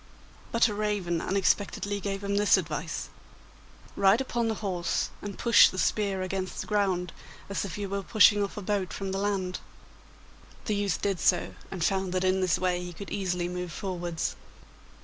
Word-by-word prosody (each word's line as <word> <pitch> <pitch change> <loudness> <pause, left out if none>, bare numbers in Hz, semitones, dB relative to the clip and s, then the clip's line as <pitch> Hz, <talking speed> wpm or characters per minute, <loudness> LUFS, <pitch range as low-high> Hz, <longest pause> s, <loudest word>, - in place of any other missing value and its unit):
But 230 0 +4
a 210 - -3
raven 205 -5 -1
unexpectedly 200 +1 0
gave 195 0 -4
him 200 0 -1
this 205 0 +5
advice: - - -4 0.9
'Ride 195 +3 +5
upon 240 -3 -1
the 220 - 0
horse, 175 -3 -1
and 205 -1 -6
push 235 -1 +7
the 185 - -8
spear 195 -1 0
against 185 0 -3
the - - -3
ground, 190 -4 0 0.4
as 200 0 -2
if 195 - -6
you 205 -1 -3
were 200 +1 -2
pushing 205 0 +5
off 200 - -5
a 210 - -4
boat 195 -3 -1
from 195 -1 -4
the 195 - -2
land.' 195 -3 -1 1.1
The 215 - 0
youth 205 -1 -1
did 195 -3 0
so, - - +2 0.2
and 185 -4 -4
found 190 0 0
that 185 0 0
in 185 0 +2
this 185 -3 +2
way 180 -1 0
he 175 0 -7
could 195 +4 -9
easily 180 -3 -1
move 180 -1 -4
forwards. 175 -4 -3
195 Hz, 180 wpm, -28 LUFS, 180-205 Hz, 1.1 s, push